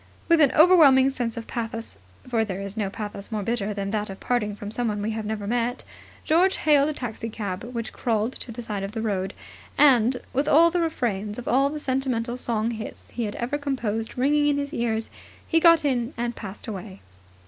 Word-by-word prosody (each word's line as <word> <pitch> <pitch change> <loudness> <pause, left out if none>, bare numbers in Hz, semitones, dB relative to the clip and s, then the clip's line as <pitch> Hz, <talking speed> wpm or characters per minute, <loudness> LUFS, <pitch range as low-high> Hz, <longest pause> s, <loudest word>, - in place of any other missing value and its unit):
With 335 -2 +5
an 280 -3 +6
overwhelming 295 -6 +6
sense 240 -4 -3
of 230 - -5
pathos, 230 - -5 0.3
for 230 -3 +1
there 195 -3 -4
is 200 +1 -6
no 210 -3 -1
pathos 205 +1 -6
more 215 -2 -2
bitter 215 -1 -1
than 200 -1 -3
that 210 -1 -2
of 195 - -8
parting 210 -4 -1
from 205 0 -7
someone 220 -3 -1
we 210 +2 -2
have 220 -1 -4
never 215 -1 -3
met, 240 +3 -1 0.4
George 360 +5 +3
hailed 295 -1 +4
a - - -2
taxicab 220 -6 -5
which 235 -2 -5
crawled 225 +1 -1
at - - -7
the 240 - -6
side 210 -3 -4
of 195 +1 -5
the 225 - -3
road; 195 -3 -2 0.4
and, 255 -3 +5 0.2
with 275 +3 0
all 335 +3 +6
the 350 0 +1
refrains 215 -10 -2
of 245 - -7
all 275 +3 +3
the 305 +1 -5
sentimental 255 -4 -1
song 230 -2 0
hits 220 -1 -8
he 235 - -2
had 205 - -5
ever 260 +5 -2
composed 230 -6 -3
ringing 290 +3 +3
in 290 -1 +2
his 285 0 -3
ears, 225 -1 -1 0.4
he 325 - +3
got 335 -2 +6
in 245 -2 0
and 240 0 -2
passed 200 -2 -8
away. 195 -2 -7
235 Hz, 205 wpm, -25 LUFS, 210-270 Hz, 0.4 s, an